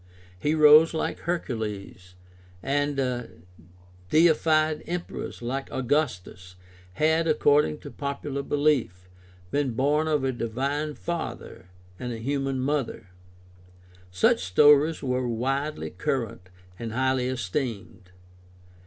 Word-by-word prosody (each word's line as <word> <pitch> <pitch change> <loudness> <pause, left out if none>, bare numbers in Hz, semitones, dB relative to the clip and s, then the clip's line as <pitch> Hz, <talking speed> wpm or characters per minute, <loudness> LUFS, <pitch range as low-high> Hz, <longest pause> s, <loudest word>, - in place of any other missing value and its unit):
Heroes 155 - +6
like - - -2
Hercules 105 - -4 0.5
and 135 -4 -1 0.8
deified 155 -1 +3
emperors 175 -7 -5
like 135 +3 -4
Augustus 115 -10 -2 0.4
had, 160 - +2
according 150 -1 +3
to - - -9
popular 140 0 -4
belief, 140 -11 0 0.4
been 140 -4 0
born 145 +6 +1
of 150 -3 +1
a 135 - +1
divine 140 +6 -2
father 165 - -6 0.3
and 125 -1 -4
a 115 - -4
human 135 +2 -2
mother. 135 -7 -2 1.0
Such 90 0 +2
stories 145 - +4
were 125 -1 -1
widely 135 +6 -2
current 120 -11 -3 0.3
and 115 -1 -5
highly 130 0 +1
esteemed. 115 -5 -4
135 Hz, 100 wpm, -26 LUFS, 120-150 Hz, 1.0 s, Heroes